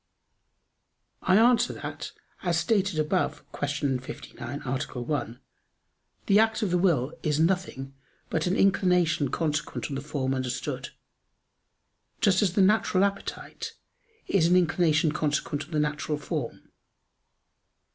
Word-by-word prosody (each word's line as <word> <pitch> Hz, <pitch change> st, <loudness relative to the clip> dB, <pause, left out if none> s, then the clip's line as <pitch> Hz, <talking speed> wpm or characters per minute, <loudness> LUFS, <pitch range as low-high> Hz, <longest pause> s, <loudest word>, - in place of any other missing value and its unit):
I 185 Hz, +1 st, +4 dB
answer 240 Hz, +1 st, +4 dB
that, -, -, -6 dB, 0.3 s
As 175 Hz, -3 st, +1 dB
stated 195 Hz, 0 st, +1 dB
above 155 Hz, +4 st, 0 dB
(Q. 145 Hz, -2 st, -1 dB
59, 130 Hz, +1 st, -7 dB
A. 125 Hz, -, -2 dB, 0.3 s
1), 120 Hz, -2 st, -3 dB, 0.9 s
the 200 Hz, +1 st, +5 dB
act 225 Hz, 0 st, +2 dB
of 195 Hz, -, 0 dB
the 180 Hz, -, +2 dB
will 155 Hz, -6 st, +2 dB
is 150 Hz, -2 st, 0 dB
nothing 160 Hz, -6 st, 0 dB, 0.4 s
but 160 Hz, +2 st, 0 dB
an 180 Hz, -, +1 dB
inclination 180 Hz, -7 st, +3 dB
consequent 150 Hz, +1 st, -2 dB
on -, -, -4 dB
the 135 Hz, -, -3 dB
form 140 Hz, -2 st, -2 dB
understood; 130 Hz, -1 st, -3 dB, 1.3 s
just 200 Hz, -5 st, +3 dB
as 190 Hz, -5 st, +2 dB
the 195 Hz, -, +4 dB
natural 200 Hz, -1 st, +3 dB
appetite 200 Hz, 0 st, -4 dB, 0.5 s
is 175 Hz, -5 st, +3 dB
an 180 Hz, -, +4 dB
inclination 165 Hz, -3 st, +3 dB
consequent 150 Hz, -1 st, -1 dB
on 160 Hz, -, -20 dB
the 155 Hz, -, 0 dB
natural 150 Hz, 0 st, -1 dB
form. 150 Hz, -4 st, -5 dB
160 Hz, 125 wpm, -27 LUFS, 145-190 Hz, 1.3 s, the